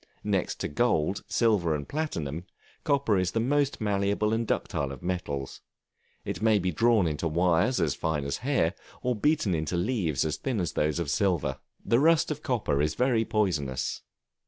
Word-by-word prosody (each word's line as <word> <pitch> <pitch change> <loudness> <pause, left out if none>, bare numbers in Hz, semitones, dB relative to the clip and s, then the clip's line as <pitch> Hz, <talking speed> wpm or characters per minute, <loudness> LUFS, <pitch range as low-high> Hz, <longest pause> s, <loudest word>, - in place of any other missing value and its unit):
Next 100 -4 0
to - - -1
gold, 95 -2 0
silver, 100 -9 +2
and 70 -1 -5
platinum, 85 - -3 0.4
copper 140 -9 +2
is 90 0 -1
the 115 - +1
most 140 +4 +1
malleable 100 +1 0
and 115 0 -1
ductile 70 -1 -1
of 70 - -9
metals; 75 -7 -3 0.6
it - - -4
may 110 -1 +4
be 90 -2 0
drawn 115 +1 +3
into 80 +1 -1
wires 90 +8 +2
as 80 -6 +1
fine 75 +1 -2
as 70 - -2
hair, 125 - +1 0.3
or 125 -1 +1
beaten 145 - +1
into 80 +2 -1
leaves 85 - 0
as 75 - -1
thin 130 -6 -2
as 85 -5 -2
those 75 +1 0
of 85 -5 -2
silver. 75 -5 0 0.3
The 115 - +3
rust 160 +1 +4
of 150 0 -4
copper 110 - 0
is 75 +1 0
very 125 -3 +2
poisonous. 75 -13 -1
95 Hz, 175 wpm, -28 LUFS, 75-115 Hz, 0.6 s, may